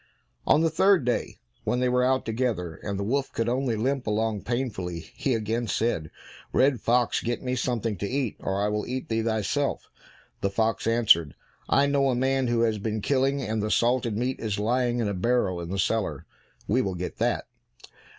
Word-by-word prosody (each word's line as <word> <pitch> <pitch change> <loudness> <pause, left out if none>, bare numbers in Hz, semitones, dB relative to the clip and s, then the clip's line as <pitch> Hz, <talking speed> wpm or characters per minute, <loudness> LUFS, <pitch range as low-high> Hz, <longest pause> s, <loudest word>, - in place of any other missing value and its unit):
On 150 - +5
the 165 -1 +2
third 190 -8 +4
day, 125 - -1 0.3
when 125 - 0
they 125 - +2
were 125 0 +2
out 130 +1 +2
together, 110 -7 -1
and 100 -1 -3
the 100 - -2
wolf 135 +6 -1
could 115 - -1
only 125 -1 0
limp 130 +3 -1
along 110 -1 0
painfully, 100 -9 -3
he 130 -4 0
again 115 +2 -1
said, 105 -9 -1 0.4
"Red 130 -4 +3
fox, 120 0 +2
get 120 +2 -2
me 125 -1 -1
something 120 -4 -1
to 100 - -3
eat, 130 -4 -1
or 95 +1 -2
I - - +2
will 105 0 -2
eat 130 +1 -4
thee 115 0 +1
thyself." 115 +6 -1 0.5
The 100 - 0
fox 110 +3 0
answered, 110 -10 +4 0.3
"I 140 - +4
know 140 -1 +2
a 125 - +1
man 130 +1 +1
who 120 -1 +1
has 110 -2 +1
been 110 +1 -2
killing, 135 0 +1
and 110 -1 -1
the 105 - -1
salted 120 -1 +1
meat 125 +3 -1
is 105 -3 -2
lying 120 +3 +1
in 110 - 0
a 100 - -1
barrel 95 -3 +1
in 85 - -6
the 95 - -3
cellar; 95 -8 -1 0.4
we 125 +5 +2
will 95 -6 -2
get 90 +1 -5
that." - - 0
115 Hz, 200 wpm, -26 LUFS, 105-130 Hz, 0.5 s, On